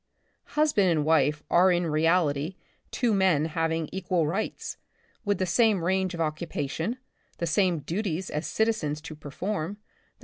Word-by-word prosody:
Hus 305 0 +4
band 195 -3 +4
and 155 -3 +1
wife 150 -1 +3
arc 180 +1 +5
in 175 0 0
reality 160 0 +1 0.3
two 240 -3 +1
men 185 -6 +3
having 165 0 -1
equal 180 -3 0
rights, 190 +8 -3 0.5
with 205 -2 +1
the 185 - 0
same 205 0 +3
range 185 0 0
of - - -8
occupation, 160 - -2 0.4
the 170 - -1
same 175 +1 +2
duties 185 +2 -3
as 150 +2 -2
citizens 215 -10 0
to 165 0 -8
perform, 155 +4 -4 0.4
the - - -45
170 Hz, 150 wpm, -27 LUFS, 155-190 Hz, 0.5 s, arc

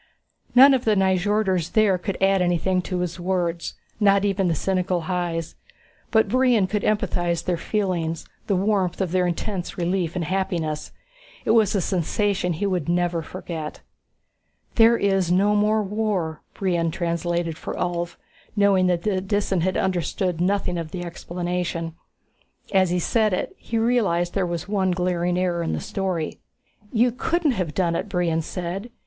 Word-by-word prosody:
None 270 +3 +9
of 255 -2 +1
the 215 -1 +3
Nyjorders 190 -2 +1
there 205 -4 +4
could 190 +2 -3
add 195 0 +3
anything 180 +1 +1
to 180 0 -3
his 180 0 -3
words, 175 -2 -1 0.2
not 200 -1 +4
even 195 -2 +1
the 165 - +1
cynical 185 +1 0
Hys. 170 -1 -2 0.6
But 220 -1 +3
Brion 250 -5 +3
could 210 +2 -1
empathize 175 -5 0
their 180 - +1
feelings, 170 -4 -2 0.2
the 200 - +2
warmth 190 -2 +1
of 190 -4 -1
their 180 0 +2
intense 180 +2 -3
relief 175 -1 -1
and 175 -2 -1
happiness. 170 -4 -2 0.5
It - - +3
was 220 -3 +4
a 195 - +2
sensation 185 +1 0
he 170 +6 -2
would 180 -6 -1
never 175 -1 +1
forget. 160 -2 -6 0.9
"There 230 0 +6
is 195 -4 +1
no 200 +3 +3
more 210 +1 +2
war," 195 -6 -2
Brion 175 -4 0
translated 170 0 -1
for - - -6
Ulv, 175 -1 -2 0.4
knowing 200 -3 +4
that 175 -1 +1
the 195 -3 0
Disan 195 -2 0
had 185 +2 0
understood 180 -1 -1
nothing 180 -2 0
of 165 -2 -5
the 175 +1 -5
explanation. 175 -1 -3 0.8
As 190 -2 +4
he 180 - +1
said 215 +3 +1
it, 185 - -2
he 230 - -4
realized 215 -7 +2
that - - -4
there 190 - +2
was 170 +1 -4
one 195 -2 +1
glaring 180 0 0
error 180 -2 0
in 165 - -1
the - - -1
story. 185 -5 -3 0.5
"You 240 +1 +3
couldn't 320 +5 0
have 180 - -3
done 170 -3 +1
it," 205 - -3
Brion 175 -4 0
said. 180 +6 -5
185 Hz, 165 wpm, -23 LUFS, 175-200 Hz, 0.9 s, None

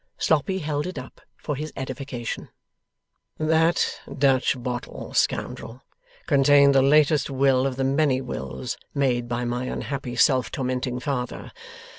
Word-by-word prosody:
Sloppy 160 +5 +1
held 150 -2 -2
it 185 - -6
up, - - -9 0.2
for 150 - -4
his 155 +3 -5
edification. 130 -2 -5 0.9
'That 160 +2 +1 0.2
Dutch 135 -1 +3
bottle, 125 -1 -5
scoundrel, 125 +4 -1 0.4
contained 140 -1 +5
the 135 - +5
latest 150 +2 +4
will 135 -1 +2
of 130 - -3
the 135 - -1
many 135 0 +2
wills 65 - -5 0.2
made 125 -4 +1
by 120 0 -2
my 120 +1 -2
unhappy 130 -1 -4
self 125 0 +3
tormenting 125 -2 -2
father. 125 -2 -4
135 Hz, 130 wpm, -24 LUFS, 125-145 Hz, 0.9 s, contained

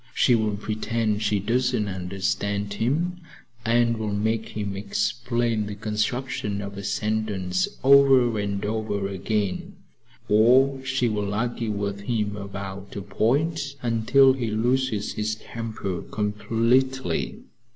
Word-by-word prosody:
She 125 - +4
will 110 -3 +1
pretend 110 0 -1
she 105 -1 +1
doesn't 120 +1 +1
understand 100 +2 -2
him 165 - -1 0.4
and 115 0 +2
will 105 -2 -2
make 110 +1 -1
him 100 -2 -3
explain 115 +2 -1
the 105 - -5
construction 105 0 -2
of 100 0 -6
a 100 - -6
sentence 100 -4 -1 0.2
over 135 -4 +6
and 100 -1 -2
over 105 -2 -1
again, 100 0 -2 0.5
or 130 +5 +4
she 130 -2 +1
will 105 -2 -1
argue 120 0 -1
with 100 -1 -2
him 105 -1 -1
about 100 -1 -7
a 100 - -4
point 140 - 0
until 125 +4 +4
he 125 -4 -2
loses 115 0 0
his 110 0 -1
temper 110 -5 -5
completely. 115 +5 0
110 Hz, 120 wpm, -25 LUFS, 100-120 Hz, 0.5 s, over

